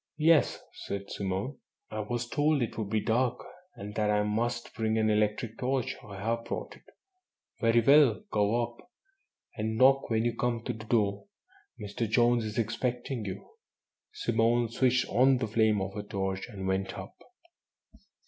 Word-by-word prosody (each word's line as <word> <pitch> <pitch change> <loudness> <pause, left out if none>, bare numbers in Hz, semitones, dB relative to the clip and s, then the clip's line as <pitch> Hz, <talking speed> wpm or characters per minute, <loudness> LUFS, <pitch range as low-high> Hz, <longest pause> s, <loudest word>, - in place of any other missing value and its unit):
"Yes," 160 0 +4
said 100 0 -6
Simone, 100 +7 -3 0.3
"I 110 - -4
was 120 +3 -3
told 145 +1 +2
it 115 - -4
would 110 -3 -3
be 110 0 +1
dark, 125 +3 0 0.3
and 105 +1 -8
that 105 0 0
I 105 0 +2
must 120 +3 -2
bring 110 0 0
an 110 -1 +2
electric 105 +2 0
torch. 130 0 -1
I 100 -2 -9
have 115 +3 -2
brought - - -5
it." - - -21 0.7
"Very 115 0 +4
well. 135 -4 +5
Go 105 +3 +2
up, 120 0 -6 0.8
and 110 +1 -2
knock 135 +3 +5
when 110 0 +1
you 120 -1 0
come 120 -1 -1
to 125 - -2
the 110 -1 -10
door. 100 -3 0 0.5
Mr. 105 +2 -3
Jones 120 +1 +3
is 105 -1 -5
expecting 120 +1 -2
you." 95 0 -6 0.6
Simone 115 +1 +1
switched 125 +1 +2
on 130 +2 +4
the 120 - -1
flame 110 -1 +2
of 95 0 -4
her 105 - -4
torch, 95 0 -3
and 95 -4 -6
went 95 0 -1
up. 95 +2 -8
115 Hz, 165 wpm, -29 LUFS, 105-120 Hz, 0.8 s, well